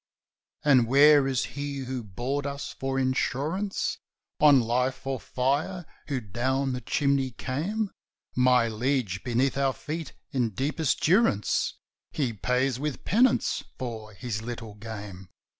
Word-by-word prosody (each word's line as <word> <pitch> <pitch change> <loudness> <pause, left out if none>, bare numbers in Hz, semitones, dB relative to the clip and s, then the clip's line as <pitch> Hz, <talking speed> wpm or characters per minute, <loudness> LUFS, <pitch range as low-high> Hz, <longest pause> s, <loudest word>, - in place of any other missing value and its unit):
"And 130 -5 +5
where 140 +2 +6
is 130 -2 0
he 140 -1 -5
who 130 0 -3
bored 125 +8 -3
us 140 0 -5
for 135 0 -3
insurance 140 +9 -1 0.4
On 145 -3 +7
life 125 +3 0
or 135 -1 -2
fire, 145 +10 -1 0.2
who 140 -3 -1
down 130 +5 -1
the 125 - -4
chimney 140 -1 +1
came?" 175 - -2 0.4
"My 125 -2 +4
liege, 115 -4 -1
beneath 130 +2 +1
our 135 -1 +2
feet 160 +3 -6 0.2
in 120 -7 0
deepest 145 +2 0
durance 175 - +2 0.4
He 130 -6 -1
pays 125 +4 0
with 150 -2 -4
penance 235 +5 +3
for 110 -4 -6
his 110 -1 -4
little 115 -2 -6
game." 100 -3 -8
130 Hz, 130 wpm, -27 LUFS, 120-145 Hz, 0.4 s, On